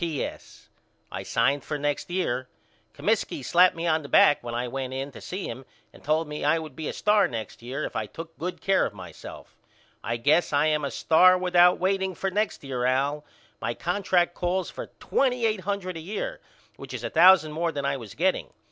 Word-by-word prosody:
P.S. 165 Hz, -5 st, -5 dB, 0.4 s
I -, -, -5 dB
signed 135 Hz, +5 st, +1 dB
up -, -, -21 dB
for 150 Hz, -, -3 dB
next 145 Hz, +2 st, -2 dB
year. 130 Hz, -9 st, -2 dB, 0.4 s
Comiskey 205 Hz, -, -1 dB
slapped 180 Hz, +1 st, +5 dB
me 165 Hz, +1 st, -4 dB
on 160 Hz, -1 st, +2 dB
the 140 Hz, -, -10 dB
back 145 Hz, -, +5 dB
when 120 Hz, -1 st, -5 dB
I 120 Hz, +1 st, -2 dB
went 130 Hz, +1 st, -4 dB
in 135 Hz, +2 st, -4 dB
to -, -, -12 dB
see 185 Hz, +2 st, -5 dB
him 125 Hz, +3 st, -6 dB, 0.3 s
and -, -, -17 dB
told 155 Hz, +2 st, +1 dB
me 150 Hz, 0 st, -6 dB
I 150 Hz, +3 st, +3 dB
would 155 Hz, -4 st, -7 dB
be 160 Hz, -, -5 dB
a -, -, -2 dB
star 210 Hz, -1 st, +3 dB
next 115 Hz, -2 st, -7 dB
year 130 Hz, +5 st, -5 dB
if -, -, -7 dB
I -, -, -2 dB
took 165 Hz, 0 st, -10 dB
good 180 Hz, +2 st, -4 dB
care 195 Hz, -, +3 dB
of 105 Hz, -, -12 dB
myself 95 Hz, -, -11 dB, 0.4 s
I 120 Hz, -, -2 dB
guess 150 Hz, +7 st, +2 dB
I 145 Hz, +1 st, +3 dB
am 155 Hz, -1 st, +1 dB
a 140 Hz, -, -1 dB
star 185 Hz, +6 st, +5 dB
without 180 Hz, -1 st, +4 dB
waiting 190 Hz, 0 st, 0 dB
for 195 Hz, +2 st, -2 dB
next 210 Hz, -2 st, -1 dB
year 130 Hz, -3 st, -3 dB
Al. 140 Hz, +4 st, +1 dB, 0.4 s
My 115 Hz, -, -2 dB
contract 175 Hz, -1 st, +1 dB
calls 180 Hz, +1 st, -2 dB
for -, -, -7 dB
twenty 250 Hz, -3 st, +1 dB
eight 215 Hz, -2 st, +1 dB
hundred 185 Hz, -1 st, -3 dB
a -, -, -5 dB
year 215 Hz, -, -5 dB, 0.4 s
which -, -, -8 dB
is -, -, -6 dB
a -, -, -3 dB
thousand 180 Hz, -4 st, +6 dB
more 165 Hz, +2 st, -1 dB
than 140 Hz, -3 st, -4 dB
I 140 Hz, 0 st, 0 dB
was 115 Hz, -6 st, -10 dB
getting. 185 Hz, +4 st, 0 dB
160 Hz, 215 wpm, -26 LUFS, 140-185 Hz, 0.4 s, thousand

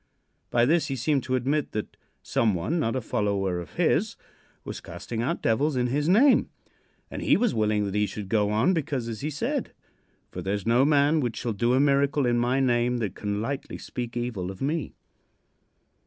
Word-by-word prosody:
By 120 Hz, 0 st, +3 dB
this 160 Hz, +5 st, +2 dB
he 135 Hz, -, -2 dB
seemed 135 Hz, +3 st, +1 dB
to 130 Hz, -, 0 dB
admit 140 Hz, +4 st, -1 dB
that 105 Hz, -, -4 dB, 0.3 s
some 110 Hz, -4 st, +1 dB
one, 135 Hz, -, -1 dB
not 115 Hz, -5 st, 0 dB
a 130 Hz, -, -1 dB
follower 100 Hz, -4 st, -1 dB
of 85 Hz, -4 st, -9 dB
his, -, -, +1 dB, 0.5 s
was -, -, -7 dB
casting 95 Hz, +7 st, -6 dB
out 120 Hz, -, -2 dB
devils 140 Hz, +6 st, +1 dB
in 125 Hz, -1 st, +1 dB
his 145 Hz, +6 st, 0 dB
name, 250 Hz, +9 st, +5 dB, 0.6 s
and -, -, -5 dB
he -, -, +4 dB
was 235 Hz, +2 st, +1 dB
willing 105 Hz, -1 st, +1 dB
that 100 Hz, -, -4 dB
he 105 Hz, 0 st, +1 dB
should 105 Hz, -2 st, -6 dB
go 105 Hz, 0 st, +1 dB
on, 110 Hz, -, +2 dB
because, 140 Hz, -7 st, -2 dB
as 115 Hz, 0 st, -5 dB
he 150 Hz, -, -2 dB
said: 150 Hz, 0 st, -3 dB, 0.6 s
"For -, -, -6 dB
there 95 Hz, +2 st, -1 dB
is 100 Hz, -, -5 dB
no 120 Hz, +4 st, +4 dB
man 145 Hz, +1 st, +3 dB
which 120 Hz, -5 st, -2 dB
shall 120 Hz, -2 st, -2 dB
do 120 Hz, +5 st, +1 dB
a -, -, +3 dB
miracle 140 Hz, 0 st, +2 dB
in 120 Hz, -1 st, +2 dB
my 125 Hz, +3 st, +1 dB
name 120 Hz, -1 st, +2 dB
that 110 Hz, -6 st, -2 dB
can 105 Hz, 0 st, -3 dB
lightly 140 Hz, +3 st, -4 dB
speak 120 Hz, -1 st, -6 dB
evil 115 Hz, -7 st, -3 dB
of 95 Hz, -, -8 dB
me." 150 Hz, +3 st, -2 dB
120 Hz, 200 wpm, -26 LUFS, 105-140 Hz, 0.6 s, name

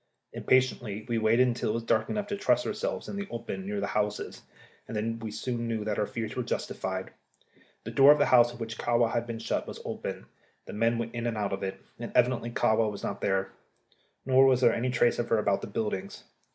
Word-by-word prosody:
Impatiently 120 Hz, -5 st, +1 dB
we 115 Hz, -2 st, 0 dB
waited 115 Hz, +3 st, +4 dB
until 120 Hz, -2 st, -1 dB
it -, -, +1 dB
was 115 Hz, 0 st, -2 dB
dark 110 Hz, -1 st, +1 dB
enough 210 Hz, -1 st, -1 dB
to 205 Hz, -, -3 dB
trust 200 Hz, -, +2 dB
ourselves -, -, -3 dB
in -, -, -5 dB
the 200 Hz, 0 st, -4 dB
open 115 Hz, +11 st, -5 dB
near 205 Hz, 0 st, -2 dB
the -, -, -1 dB
houses, 105 Hz, 0 st, -2 dB, 0.5 s
and 110 Hz, -, -4 dB
then 115 Hz, +2 st, -2 dB
we 110 Hz, -1 st, -5 dB
soon 120 Hz, +2 st, -3 dB
knew 110 Hz, -2 st, -2 dB
that 105 Hz, -1 st, -1 dB
our 105 Hz, -, +1 dB
fears 110 Hz, -2 st, -4 dB
were 125 Hz, -, -1 dB
justified. 120 Hz, -, -3 dB, 0.7 s
The -, -, -6 dB
door 140 Hz, +1 st, +8 dB
of 150 Hz, -, +6 dB
the 145 Hz, -, +3 dB
house 120 Hz, -1 st, +5 dB
in 120 Hz, -, -11 dB
which 115 Hz, -1 st, -6 dB
Kahwa 120 Hz, -1 st, +2 dB
had 120 Hz, 0 st, -1 dB
been 115 Hz, -1 st, -4 dB
shut -, -, -2 dB
was -, -, -7 dB
open; -, -, -5 dB, 0.4 s
the -, -, -8 dB
men 115 Hz, +2 st, +1 dB
went 115 Hz, 0 st, -4 dB
in 120 Hz, 0 st, -2 dB
and 115 Hz, -2 st, -2 dB
out 100 Hz, -2 st, -1 dB
of 95 Hz, -, -3 dB
it, 95 Hz, 0 st, -4 dB, 0.2 s
and -, -, -5 dB
evidently 120 Hz, -1 st, +2 dB
Kahwa 110 Hz, -1 st, +2 dB
was 100 Hz, -, -7 dB
not -, -, -4 dB
there. 95 Hz, -1 st, 0 dB, 0.7 s
Nor 130 Hz, +1 st, +6 dB
was 130 Hz, -1 st, +3 dB
there 120 Hz, -2 st, +5 dB
any 125 Hz, +2 st, -1 dB
trace 120 Hz, -1 st, +2 dB
of 120 Hz, -, -2 dB
her 115 Hz, -, +3 dB
about 100 Hz, -2 st, +1 dB
the -, -, -5 dB
buildings. 105 Hz, -2 st, -4 dB
115 Hz, 230 wpm, -29 LUFS, 110-125 Hz, 0.7 s, door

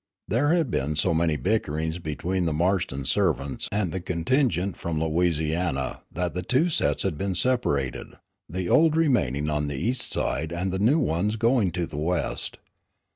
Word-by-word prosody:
There 145 Hz, -, +2 dB
had 160 Hz, -8 st, 0 dB
been 75 Hz, +3 st, -1 dB
so 85 Hz, +3 st, +2 dB
many 80 Hz, -1 st, +1 dB
bickerings 80 Hz, -4 st, -1 dB
between 85 Hz, +3 st, -2 dB
the 80 Hz, -, 0 dB
Marston 85 Hz, -5 st, 0 dB
servants 70 Hz, +3 st, 0 dB
and 100 Hz, -4 st, 0 dB
the 95 Hz, -, -3 dB
contingent 90 Hz, -, 0 dB
from 80 Hz, -2 st, -3 dB
Louisiana 80 Hz, -4 st, 0 dB
that 90 Hz, 0 st, -2 dB
the 90 Hz, -, -2 dB
two 130 Hz, -, +2 dB
sets 160 Hz, -, +1 dB
had 85 Hz, -6 st, -2 dB
been 100 Hz, -2 st, -1 dB
separated, 75 Hz, -, 0 dB, 0.3 s
the 90 Hz, +2 st, -3 dB
old 160 Hz, -, +4 dB
remaining 75 Hz, -, +1 dB
on 75 Hz, -1 st, 0 dB
the 70 Hz, -1 st, -4 dB
east 120 Hz, -, +1 dB
side 80 Hz, +5 st, -1 dB
and 90 Hz, +2 st, -2 dB
the 95 Hz, -, -2 dB
new 120 Hz, +10 st, +4 dB
ones 105 Hz, -, 0 dB
going 115 Hz, -4 st, +2 dB
to 90 Hz, -1 st, -1 dB
the 75 Hz, -, -8 dB
west. 85 Hz, +3 st, -1 dB
90 Hz, 170 wpm, -25 LUFS, 75-105 Hz, 0.3 s, old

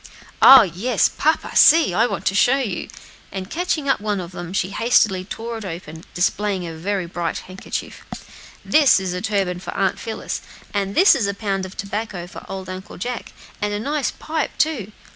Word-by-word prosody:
"Oh! 265 Hz, -2 st, +10 dB
yes, 200 Hz, +6 st, +1 dB
papa 315 Hz, +1 st, 0 dB
see! 320 Hz, -, +6 dB
I 230 Hz, +6 st, +3 dB
want 195 Hz, -5 st, -5 dB
to -, -, +2 dB
show 245 Hz, +6 st, +4 dB
you!" 215 Hz, -10 st, -3 dB, 0.4 s
and 190 Hz, 0 st, -6 dB
catching 325 Hz, -4 st, -1 dB
up 270 Hz, -, +2 dB
one 210 Hz, -2 st, -1 dB
of 175 Hz, -1 st, -7 dB
them, 175 Hz, -1 st, -7 dB
she 190 Hz, 0 st, -1 dB
hastily 215 Hz, -5 st, +2 dB
tore 225 Hz, +4 st, -6 dB
it -, -, -9 dB
open, 165 Hz, -3 st, -8 dB
displaying 190 Hz, +1 st, 0 dB
a 165 Hz, -, -6 dB
very 185 Hz, +2 st, -3 dB
gay 170 Hz, -1 st, -3 dB
handkerchief. 185 Hz, +1 st, -6 dB, 0.6 s
"This 295 Hz, -8 st, +5 dB
is 185 Hz, -2 st, -3 dB
a 180 Hz, -, -4 dB
turban 195 Hz, -4 st, -1 dB
for -, -, -7 dB
Aunt 195 Hz, -2 st, 0 dB
Phillis; 225 Hz, -, -5 dB, 0.3 s
and 200 Hz, -1 st, -2 dB
this 380 Hz, +3 st, +7 dB
is 230 Hz, -7 st, 0 dB
a 200 Hz, -, -2 dB
pound 195 Hz, -2 st, -2 dB
of 190 Hz, -, -14 dB
tobacco 200 Hz, -3 st, -4 dB
for 175 Hz, -, -11 dB
old 190 Hz, -1 st, -6 dB
Uncle 185 Hz, +1 st, -8 dB
Jack, 245 Hz, +6 st, -5 dB, 0.3 s
and 205 Hz, 0 st, -1 dB
a -, -, -2 dB
nice 285 Hz, +5 st, -1 dB
pipe, 315 Hz, -2 st, -4 dB
too. 260 Hz, -11 st, 0 dB
200 Hz, 190 wpm, -21 LUFS, 185-235 Hz, 0.6 s, Oh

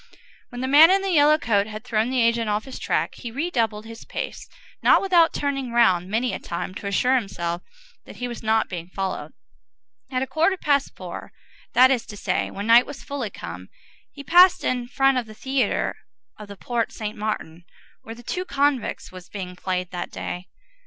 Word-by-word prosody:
When 245 Hz, -1 st, -7 dB
the 260 Hz, -, -1 dB
man 295 Hz, +5 st, +8 dB
in 390 Hz, +1 st, +3 dB
the 390 Hz, -, -1 dB
yellow 305 Hz, -2 st, +5 dB
coat 210 Hz, -7 st, +1 dB
had 215 Hz, 0 st, -8 dB
thrown 225 Hz, -1 st, 0 dB
the 255 Hz, -2 st, +2 dB
agent 230 Hz, -1 st, +1 dB
off 210 Hz, +1 st, -1 dB
his 265 Hz, -, -8 dB
track, -, -, -1 dB
he 240 Hz, -, -7 dB
redoubled 230 Hz, -6 st, -1 dB
his 225 Hz, 0 st, -10 dB
pace, -, -, -6 dB, 0.3 s
not -, -, +6 dB
without 350 Hz, -4 st, +4 dB
turning 275 Hz, -3 st, -2 dB
round 190 Hz, -7 st, +3 dB
many 235 Hz, +4 st, 0 dB
a -, -, -3 dB
time 170 Hz, +2 st, -5 dB
to 200 Hz, -, -6 dB
assure 250 Hz, +6 st, +2 dB
himself 175 Hz, -8 st, -1 dB, 0.4 s
that -, -, -12 dB
he 245 Hz, -, -4 dB
was 240 Hz, -1 st, -7 dB
not 220 Hz, 0 st, +2 dB
being 170 Hz, -2 st, -6 dB
followed. 190 Hz, +1 st, -4 dB, 0.8 s
At 255 Hz, -1 st, -1 dB
a -, -, -1 dB
quarter 330 Hz, +7 st, +1 dB
past 285 Hz, -4 st, +1 dB
four, -, -, -8 dB, 0.4 s
that 260 Hz, +1 st, +7 dB
is 250 Hz, -4 st, 0 dB
to 205 Hz, -, -9 dB
say, -, -, -1 dB
when 200 Hz, -, -6 dB
night 235 Hz, +2 st, +6 dB
was 285 Hz, -1 st, -9 dB
fully 275 Hz, -6 st, -4 dB
come, 90 Hz, -, -9 dB, 0.4 s
he 280 Hz, -, -10 dB
passed 355 Hz, +4 st, +6 dB
in 245 Hz, -1 st, -1 dB
front 270 Hz, +1 st, +2 dB
of 235 Hz, -, -6 dB
the 215 Hz, -, -12 dB
theatre 265 Hz, -1 st, 0 dB, 0.4 s
of 210 Hz, -, -11 dB
the 200 Hz, 0 st, -10 dB
Porte 235 Hz, +1 st, -2 dB
Saint 215 Hz, 0 st, -5 dB
Martin, 190 Hz, -6 st, -4 dB, 0.4 s
where 225 Hz, -, -9 dB
The 240 Hz, -, -14 dB
Two 360 Hz, +9 st, -3 dB
Convicts 280 Hz, -7 st, -1 dB
was 185 Hz, -1 st, -12 dB
being 185 Hz, -3 st, -6 dB
played 180 Hz, -1 st, -3 dB
that 175 Hz, -1 st, -4 dB
day. 180 Hz, +1 st, -6 dB
235 Hz, 200 wpm, -23 LUFS, 205-270 Hz, 0.8 s, man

